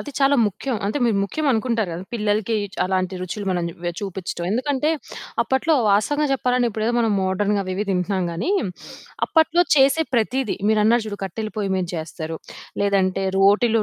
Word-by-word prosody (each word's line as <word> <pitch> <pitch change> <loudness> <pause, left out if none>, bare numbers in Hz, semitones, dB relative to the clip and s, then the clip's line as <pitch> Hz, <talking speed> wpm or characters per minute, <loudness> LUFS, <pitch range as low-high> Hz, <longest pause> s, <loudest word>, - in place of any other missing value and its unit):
అది 290 - -7
చాలా 280 0 +4
ముఖ్యం. 220 +5 -3
అంటే 215 +8 -1
మీరు 225 -4 +2
ముఖ్యమనుకుంటారు 230 - 0
గదా! 175 +3 -6
పిల్లలకి 215 0 0 0.3
అలాంటి 185 0 -1
రుచులు 195 +3 -5
మనం 180 -2 0 0.2
వె 175 - 0
చూపిచ్చటం. 190 -3 -4
ఎందుకంటే 280 +5 0 0.5
అప్పట్లో 265 +5 +1 0.2
వాస్తవంగా 290 +9 +2
జెప్పాలంటే, 250 -2 +1
ఇప్పుడేదో 220 +2 -1
మనం 225 -2 +2
మోడ్రర్న్‌‌గా 200 +2 +1
అవి 185 - -3
ఇవి 210 +1 -2
తింటున్నాం 185 0 0
గానీ, 190 - -2 0.8
అప్పట్లో 335 +2 +3
చేసే 275 +4 +4
ప్రతీదీ, 240 +1 0
మీరన్నారు 220 +2 +3
జూడు, 205 -1 -5
కట్టెల 215 +3 -4
పోయి 200 -2 -1
మీద 185 -1 -1
జేస్తారు, 160 0 -5 0.4
లేదంటే 195 -1 +1
రోటిలో 215 +3 +4
210 Hz, 150 wpm, -22 LUFS, 190-250 Hz, 0.8 s, చాలా